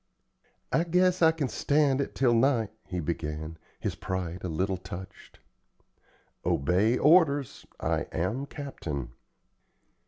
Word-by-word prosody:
"I 165 - +3
guess 180 +1 +2
I 160 -1 +7
can 160 -4 -2
stand 140 0 +2
it - - -4
till 125 -3 +3
night," 115 -3 +2 0.2
he 90 - -3
began, 80 -1 -4 0.2
his - - -2
pride 90 -1 -4
a - - -2
little 95 +4 -1
touched. 95 +2 -10 1.1
"Obey 95 - +2
orders! 145 -4 +3
I - - -1
am 110 - -2
captain." 80 - -5
110 Hz, 120 wpm, -28 LUFS, 85-145 Hz, 1.1 s, I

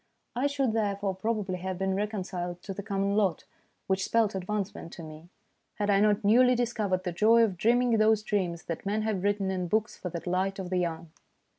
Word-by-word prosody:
I 255 +4 +2
should 275 -5 0
therefore 200 -3 0
probably 200 -1 -2
have 185 0 -4
been 190 +1 0
recon 205 0 -2
ciled 180 -1 -5
to 195 - -5
the 200 - -5
common 200 -1 -1
lot, 195 -6 +1 0.4
which 190 0 0
spelt 225 0 +2
advance 195 +1 -2
ment 165 - -9
to 170 - -9
me, 155 +2 -11 0.5
had 205 -1 0
I 195 - +4
not 210 +1 +3
newly 250 +5 +5
discovered 215 -6 -1
the 180 - -2
joy 225 +6 +5
of 205 -5 +1
dreaming 240 +6 +2
those 215 0 +4
dreams 180 -6 -1
that 165 - -5
men 210 +2 -1
have 215 -4 -1
written 200 -1 0
in 180 -1 -2
books 220 +4 0
for 180 - -6
the 170 - -4
delight 185 +2 -1
of 190 -2 -6
the 185 - +1
young. 165 -2 -3
200 Hz, 210 wpm, -28 LUFS, 185-215 Hz, 0.5 s, newly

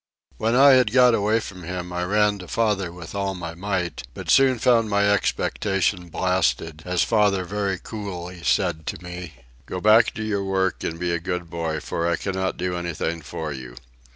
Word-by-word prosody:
When 115 +2 +1
I 140 +2 +8
had 130 -5 +5
got 125 -1 +6
away 110 +1 +2
from 95 -4 -8
him 90 +1 -5
I 90 0 -1
ran 105 +2 +2
to 90 - -9
father 105 -6 0
with 85 -1 -10
all 100 -1 -2
my 85 -2 -6
might, 90 -1 -3
but - - -3
soon 130 -2 +5
found 115 -1 +3
my 100 0 +2
expectation 95 -2 0
blasted, 80 -4 0
as 90 -1 +1
father 105 -4 +2
very 100 0 -2
coolly 90 -4 -7
said 85 -5 0
to 85 - -5
me, 90 -2 -7 0.3
"Go 90 - -4
back 110 +3 +5
to 110 - -4
your 105 -2 -1
work 95 -1 0
and 80 - -3
be 90 0 -1
a 85 - 0
good 90 -1 -4
boy, 80 -2 -2
for 85 - -2
I 85 - +2
cannot 95 +1 -2
do 90 +1 -2
anything 85 -1 -3
for 75 +1 -5
you." 65 -2 -9
95 Hz, 190 wpm, -23 LUFS, 85-105 Hz, 0.3 s, I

